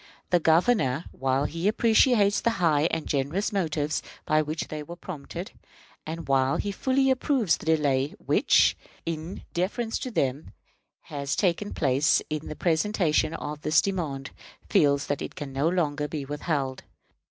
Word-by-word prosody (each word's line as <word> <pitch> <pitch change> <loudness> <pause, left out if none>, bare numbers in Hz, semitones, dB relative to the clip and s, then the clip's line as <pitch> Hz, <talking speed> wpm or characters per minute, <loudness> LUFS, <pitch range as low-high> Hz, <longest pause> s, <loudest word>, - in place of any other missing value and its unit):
The 175 - +5
Governor, 165 - +2
while 135 +1 0
he 165 +5 -2
appreciates 215 -1 +4
the - - +2
high 160 -3 +3
and 160 - -2
generous 150 +10 -1
motives 155 -5 -1 0.2
by 155 0 +3
which 155 +1 -3
they 155 0 -5
were 170 +4 -8
prompted, 175 +1 -7 0.6
and 165 +1 -5
while 135 0 +2
he 205 - -2
fully 265 +6 +2
approves 260 - +2
the - - -11
delay 145 -3 +1
which, - - +3 0.3
in 165 +2 -5
deference 215 +6 -1
to 255 - -4
them, 140 - -2 0.5
has 140 -1 -3
taken 195 +1 0
place 140 0 +2
in 155 0 -3
the 155 - -6
presentation 165 -2 +1
of 150 -2 -6
this 155 0 +3
demand, 155 -9 -2 0.4
feels 140 -1 +3
that 145 - -2
it - - -6
can 140 -2 -6
not 155 +6 +1
longer 150 -4 0
be 150 -2 -5
withheld. 145 -2 -2
155 Hz, 155 wpm, -26 LUFS, 145-185 Hz, 0.6 s, The